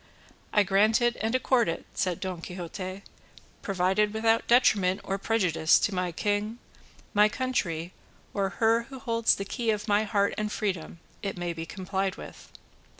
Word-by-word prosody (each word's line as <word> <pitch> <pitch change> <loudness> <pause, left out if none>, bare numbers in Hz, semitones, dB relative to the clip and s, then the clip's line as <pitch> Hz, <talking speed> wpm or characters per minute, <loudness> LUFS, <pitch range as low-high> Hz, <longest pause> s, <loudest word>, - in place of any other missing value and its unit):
"I 210 - +4
grant 205 +4 +3
and 240 -1 0
accord 255 -4 +2
it," 165 - -4
said 180 -3 -1
Don 185 -3 -4
Quixote, 185 +2 -6 0.6
"provided 195 +2 +1
without 225 +1 +2
detriment 200 -6 +4
or 195 +1 -2
prejudice 185 -7 +3
to 205 - 0
my 180 -1 -1
king, 205 +5 -1 0.6
my 210 0 +5
country, 185 - -2 0.4
or 195 -1 0
her 230 +1 +3
who 270 - -8
holds 230 -3 +2
the 195 - -5
key 230 +3 -2
of 210 +1 -1
my 205 0 +3
heart 200 -1 +1
and 210 0 -2
freedom, 185 -6 -3 0.2
it 195 -2 -4
may 175 -1 -2
be 165 0 -6
complied 190 0 -2
with." - - -11
200 Hz, 155 wpm, -28 LUFS, 185-225 Hz, 0.6 s, my